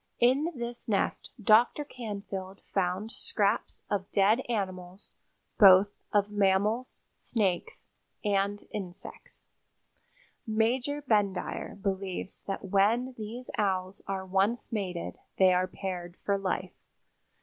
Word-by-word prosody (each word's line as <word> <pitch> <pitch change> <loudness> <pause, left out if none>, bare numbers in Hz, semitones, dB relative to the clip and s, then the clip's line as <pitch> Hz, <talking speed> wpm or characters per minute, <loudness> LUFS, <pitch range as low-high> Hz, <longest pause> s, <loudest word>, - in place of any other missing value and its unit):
In 270 +7 +3
this 235 -1 -6
nest 200 - 0
Dr. 225 +7 +4
Canfield 200 -6 -6
found 190 +3 0
scraps 210 -1 -1
of 195 -1 -2
dead 205 +4 +4
animals, 185 -3 -4 0.5
both 195 0 +9 0.2
of 205 0 +2
mammals, 205 +4 +1
snakes 195 -7 -2 0.3
and 200 0 +1
insects. 195 - -8 1.0
Major 245 +6 +1
Bendire 205 -6 0
believes 190 -1 -3
that 195 0 -4
when 215 +7 +2
these 230 +3 -7
Owls 190 -2 0
are 190 -1 -3
once 195 +5 0
mated 185 -6 -3 0.2
they 185 -1 +6
are 180 +1 +2
paired 180 -2 -5
for 200 - +2
life. 185 -1 -2
200 Hz, 105 wpm, -29 LUFS, 190-225 Hz, 1.0 s, both